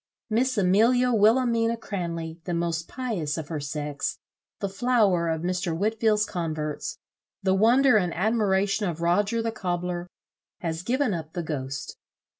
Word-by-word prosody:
Miss 250 Hz, +3 st, +1 dB
Amelia 230 Hz, +7 st, +4 dB
Wilhelmina 230 Hz, +1 st, +3 dB
Cranley, 170 Hz, -6 st, -5 dB
the 175 Hz, -, -2 dB
most 170 Hz, -1 st, -1 dB
pious 210 Hz, -, -3 dB
of 155 Hz, -2 st, -5 dB
her 160 Hz, -3 st, -3 dB
sex, 145 Hz, 0 st, -3 dB, 0.4 s
the 200 Hz, -, -1 dB
flower 195 Hz, -5 st, +2 dB
of 160 Hz, 0 st, -2 dB
Mr. 180 Hz, -2 st, -1 dB
Whitfield's 215 Hz, +1 st, +2 dB
converts, 155 Hz, -5 st, -3 dB, 0.5 s
the 190 Hz, -1 st, +3 dB
wonder 235 Hz, +4 st, +5 dB
and 180 Hz, -4 st, +1 dB
admiration 205 Hz, 0 st, +1 dB
of 170 Hz, -1 st, -5 dB
Roger 205 Hz, +7 st, +2 dB
the 225 Hz, -, -1 dB
cobler, 180 Hz, -3 st, -3 dB, 0.5 s
has 165 Hz, -1 st, -2 dB
given 250 Hz, +3 st, 0 dB
up 160 Hz, -2 st, -5 dB
the 175 Hz, -, -3 dB
ghost. 135 Hz, -3 st, -5 dB
190 Hz, 140 wpm, -26 LUFS, 165-225 Hz, 0.5 s, wonder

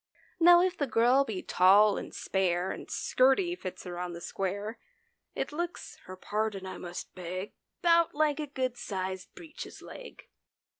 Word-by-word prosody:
Now, 345 Hz, +1 st, +8 dB
if 370 Hz, 0 st, +1 dB
the 285 Hz, -5 st, -1 dB
girl 245 Hz, +4 st, +4 dB
be 215 Hz, -8 st, -5 dB
tall 200 Hz, +3 st, +5 dB
and -, -, -6 dB
spare 185 Hz, -1 st, 0 dB
And -, -, -8 dB
skirty 270 Hz, +8 st, +2 dB
fits 185 Hz, -, -7 dB
her 175 Hz, -1 st, -6 dB
on 180 Hz, -1 st, -4 dB
the 170 Hz, -, -7 dB
square. 200 Hz, +5 st, -4 dB, 0.6 s
It -, -, -2 dB
looks 345 Hz, +3 st, -5 dB
(her 185 Hz, -, -8 dB
pardon 205 Hz, 0 st, -2 dB
I 185 Hz, -, -7 dB
must 175 Hz, 0 st, -7 dB
beg), 185 Hz, +2 st, -6 dB, 0.3 s
'Bout 335 Hz, -2 st, +4 dB
like 300 Hz, -1 st, +2 dB
a 300 Hz, -, -3 dB
good 260 Hz, -3 st, -2 dB
sized 190 Hz, -4 st, -5 dB
breeches 320 Hz, -3 st, -9 dB
leg. -, -, -11 dB
215 Hz, 160 wpm, -30 LUFS, 185-295 Hz, 0.6 s, Now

